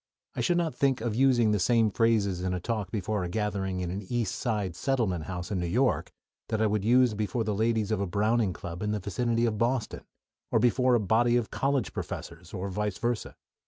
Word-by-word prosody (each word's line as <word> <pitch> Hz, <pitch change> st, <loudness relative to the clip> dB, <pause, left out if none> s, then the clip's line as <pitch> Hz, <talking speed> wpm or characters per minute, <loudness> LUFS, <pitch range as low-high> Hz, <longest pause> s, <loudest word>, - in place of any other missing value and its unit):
I -, -, -1 dB
should 175 Hz, -1 st, +2 dB
not 170 Hz, -3 st, 0 dB
think 135 Hz, -2 st, +1 dB
of 115 Hz, -1 st, -2 dB
using 120 Hz, -2 st, +4 dB
the 105 Hz, -, +1 dB
same 115 Hz, +2 st, +3 dB
phrases 105 Hz, -5 st, +2 dB
in 90 Hz, 0 st, -1 dB
a -, -, -2 dB
talk 105 Hz, -1 st, -3 dB
before 105 Hz, 0 st, -2 dB
a 90 Hz, -, -3 dB
gathering 95 Hz, -2 st, -2 dB
in 90 Hz, -1 st, -3 dB
an 95 Hz, +2 st, -4 dB
East 120 Hz, -4 st, -1 dB
Side 105 Hz, -8 st, -2 dB
settlement 95 Hz, -, 0 dB
house 90 Hz, 0 st, -5 dB
in 95 Hz, -, 0 dB
New 90 Hz, -, -1 dB
York 125 Hz, +9 st, +1 dB, 0.4 s
that 110 Hz, -, -1 dB
I 110 Hz, -, +3 dB
would 105 Hz, -1 st, 0 dB
use 125 Hz, +1 st, +4 dB
before 105 Hz, +2 st, -1 dB
the 105 Hz, -1 st, -1 dB
ladies 110 Hz, 0 st, 0 dB
of 105 Hz, -2 st, 0 dB
a 100 Hz, -, -1 dB
Browning 105 Hz, +2 st, +1 dB
Club 90 Hz, -1 st, -7 dB
in 105 Hz, 0 st, -1 dB
the 105 Hz, -, -1 dB
vicinity 115 Hz, +5 st, 0 dB
of 110 Hz, -3 st, -1 dB
Boston, 120 Hz, -1 st, 0 dB, 0.5 s
or -, -, +2 dB
before 125 Hz, +2 st, +3 dB
a -, -, +3 dB
body 120 Hz, +4 st, +3 dB
of 120 Hz, -3 st, -2 dB
college 135 Hz, -5 st, 0 dB
professors, -, -, -7 dB
or 95 Hz, +2 st, -4 dB
vice 105 Hz, 0 st, -2 dB
versa. 120 Hz, -1 st, -2 dB
110 Hz, 220 wpm, -28 LUFS, 95-120 Hz, 0.5 s, using